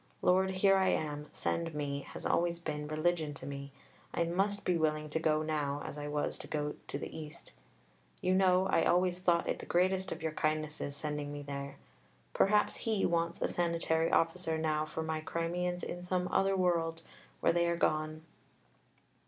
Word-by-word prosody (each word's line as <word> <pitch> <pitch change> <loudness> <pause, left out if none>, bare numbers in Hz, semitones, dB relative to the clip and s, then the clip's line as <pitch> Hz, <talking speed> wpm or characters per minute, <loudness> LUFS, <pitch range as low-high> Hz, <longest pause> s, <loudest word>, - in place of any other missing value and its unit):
"Lord, 190 +1 +4
here 195 +1 +4
I 190 0 +3
am, 150 -3 -1
send 165 -2 -2
me" 140 -1 -2
has - - -7
always 170 0 +2
been 150 -3 -4
religion 155 -1 0
to 130 - -8
me. 140 0 -6 0.4
I 170 - +2
must 195 +4 0
be 180 - +3
willing 155 -2 0
to 160 - 0
go 155 -1 +2
now 145 -2 -1
as - - -5
I 145 0 -5
was 145 0 -1
to - - -8
go 150 -1 -2
to - - -3
the - - -6
East. 155 -1 -8 0.7
You 185 - +1
know 185 0 +4
I - - +3
always 180 0 +3
thought 175 -2 +2
it - - -1
the - - -8
greatest 185 +2 +2
of - - -5
your 160 - 0
kindnesses 155 -2 -1
sending 150 -1 -3
me 145 0 -6
there. 140 0 -5 0.6
Perhaps 210 +1 +3
He 220 -3 0
wants 170 -1 0
a - - +3
"Sanitary 165 -1 +1
Officer" 165 -1 +2
now 155 -1 0
for 160 - -4
my 160 0 -2
Crimeans 175 +2 -2
in 175 - -4
some 180 0 -1
other 195 0 +3
world 165 -3 +1 0.4
where - - +3
they 170 0 +3
are 170 - 0
gone. 155 -1 0
165 Hz, 185 wpm, -33 LUFS, 150-180 Hz, 0.7 s, Lord